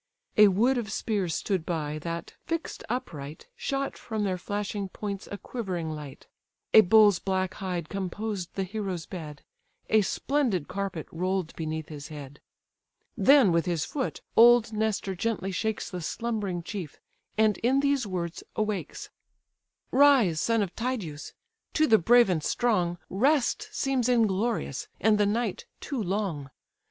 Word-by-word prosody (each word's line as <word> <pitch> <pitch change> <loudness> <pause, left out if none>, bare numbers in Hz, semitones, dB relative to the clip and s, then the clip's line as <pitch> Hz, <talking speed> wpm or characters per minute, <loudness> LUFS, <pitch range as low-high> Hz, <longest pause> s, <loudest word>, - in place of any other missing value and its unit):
A 210 0 +8
wood 235 +7 +3
of 215 -2 -5
spears 200 -7 -1
stood 190 -5 -1
by, 155 -3 -3
that, 170 +2 -5
fix'd 330 0 -3
upright, 155 - -5
Shot 275 0 -2
from 220 -2 -3
their 185 -2 -1
flashing 205 0 -3
points 200 0 -5
a 205 - -4
quivering 185 -9 -4
light. 150 -3 -8 0.5
A 220 - +10
bull's 205 -1 +6
black 190 -1 -1
hide 180 -4 -4
composed 195 0 -4
the 195 - 0
hero's 190 -3 -4
bed; 150 -5 -8 0.5
A 220 - +6
splendid 230 - 0
carpet 195 -4 -4
roll'd 185 0 -2
beneath 160 -1 -4
his 145 -2 -8
head. 145 -3 -10 0.7
Then, 270 -8 +6
with 170 +1 +1
his 170 -3 0
foot, 270 -4 -3
old 235 -1 +6
Nestor 215 -2 -1
gently 195 0 -2
shakes 220 +3 -2
The 180 -2 -4
slumbering 205 -2 -3
chief, 180 -5 -6 0.4
and 215 -1 +3
in 255 +4 +2
these 280 -5 +1
words 175 -3 -4
awakes: 215 -2 -3 0.8
"Rise, 260 - +5
son 230 -2 +2
of 185 - -6
Tydeus! 220 - -4 0.4
to 310 - +4
the 220 -6 +5
brave 240 +7 +6
and 170 -5 0
strong 180 -8 +1
Rest 285 - +2
seems 265 - 0
inglorious, 220 - +1
and 215 -1 +3
the 205 - +4
night 220 -1 -1
too 275 -5 -3
long. 185 -8 -2
200 Hz, 145 wpm, -27 LUFS, 175-230 Hz, 0.8 s, A